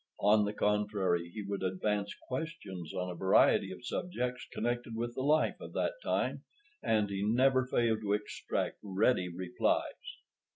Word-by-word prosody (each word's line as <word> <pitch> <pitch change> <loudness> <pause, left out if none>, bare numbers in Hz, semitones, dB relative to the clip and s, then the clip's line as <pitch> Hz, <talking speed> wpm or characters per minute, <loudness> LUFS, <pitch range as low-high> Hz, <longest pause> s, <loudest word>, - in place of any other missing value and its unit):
On 105 +1 +5
the 105 - -2
contrary, 105 -5 +1
he 105 +4 -6
would 100 0 -3
advance 100 +2 -1
questions 105 - -5
on 90 0 -3
a - - -6
variety 95 +1 +4
of 95 +6 -9
subjects 125 -7 -3
connected 120 0 -2
with 120 +1 -2
the 130 - -3
life 150 +3 +2
of - - -8
that - - 0
time, - - 0 0.4
and 105 -2 +2
he 100 0 -2
never 130 +4 +3
failed 115 -3 +1
to 100 -1 0
extract 105 0 -2
ready 95 -1 +2
replies. 90 +1 -1
105 Hz, 155 wpm, -32 LUFS, 95-120 Hz, 0.4 s, On